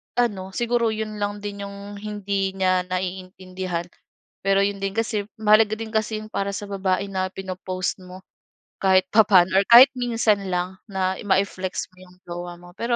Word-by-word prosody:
ano 205 -6 0
siguro 235 -1 +1
yun 215 -1 -5
lang 205 0 -2
din 200 -1 -5
yung 200 0 -9
hindi 200 -2 -2
niya 185 -1 +2
naiintindihan. 185 -1 -4 0.6
Pero 195 0 +4
yun 200 0 -1
din 195 0 -2
kasi 220 -2 -1
mahalaga 215 0 +4
din 225 0 -6
kasi 220 0 -1
yun 215 - -11
para 200 0 -2
sa 205 - -5
babae 195 0 -1
na 185 -1 -1
pino-post 185 0 -4
mo 185 +1 -11 0.6
kahit 190 -1 +4
papaano 190 -4 +5
or 200 - +1
kahit 245 +3 +10
minsan 225 -5 +1
lang 180 +1 -2
na 190 -1 -1
mai-flex 190 -1 -1
mo - - -26
yung 180 - -19
jowa 175 0 -6
mo, 175 0 -14
pero 235 +1 0
195 Hz, 165 wpm, -23 LUFS, 185-215 Hz, 0.6 s, kahit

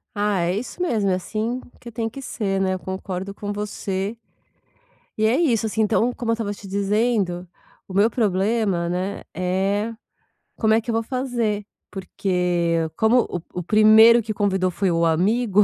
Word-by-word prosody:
Ah, 205 -3 +1
é 175 +2 0
isso 250 +9 -6
mesmo, 220 - +1
é 185 - +2
assim 220 +6 -3 0.2
que 235 - -9
tem 225 0 -2
que 275 - -9
ser, 195 -6 -2
né, 190 -1 +1
eu 185 - -6
concordo 190 +1 -5
com 205 0 -5
você. 205 0 -3 1.0
E 215 - +2
é 230 - +3
isso, 235 -10 +2
assim, 220 +1 -1
então 225 +3 +2
como 235 -2 -3
eu - - +3
estava 225 -3 -2
te 200 -1 -11
dizendo, 200 -2 0 0.4
o 190 - -9
meu 205 +4 +4
problema, 200 -4 0
né, 185 +3 -3
é 195 +5 -1 0.6
como 220 -1 +3
é 225 - +4
que 235 - -5
eu - - 0
vou 225 - +1
fazer. 235 -4 -2 0.3
Porque 180 -3 -1
como 235 +3 +4
o 175 - -4 0.2
o - - -4
primeiro 220 +4 +6
que 215 0 -3
convidou 190 -3 +1
foi 190 +1 0
o 165 0 +2
amigo, 205 +6 +3
205 Hz, 175 wpm, -22 LUFS, 185-225 Hz, 1.0 s, primeiro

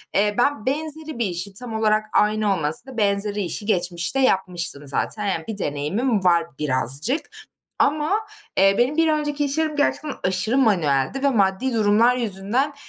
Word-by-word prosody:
Eee, 205 +1 +2
ben 245 -2 0
benzeri 310 0 -2
bir 235 - +1
işi, 185 +1 -1
tam 235 +3 -2
olarak 215 -1 +1
aynı 210 -1 +2
olmasa 155 - 0
da 250 - -12
benzeri 205 0 0
işi 195 +3 -1
geçmişte 180 +2 +1
yapmıştım 180 - +1
zaten. 210 +9 0
Yani, 175 -5 -2
bir 220 - -5
deneyimim 195 - -1
var 170 -2 +3 0.2
birazcık. 150 - -1 0.5
Ama, 300 +2 +1 0.5
eee, 195 +1 +4
benim 255 +6 +1
bir 325 -1 +3
önceki 295 -1 -1
iş 280 +1 -2
yerim 315 -1 -1
gerçekten 290 0 -1
aşırı 190 +7 +1
manueldi 180 - +1
ve 280 - +4
maddi 205 +2 0
durumlar 225 +3 +3
yüzünden, 235 +5 -1
210 Hz, 160 wpm, -22 LUFS, 185-265 Hz, 0.5 s, eee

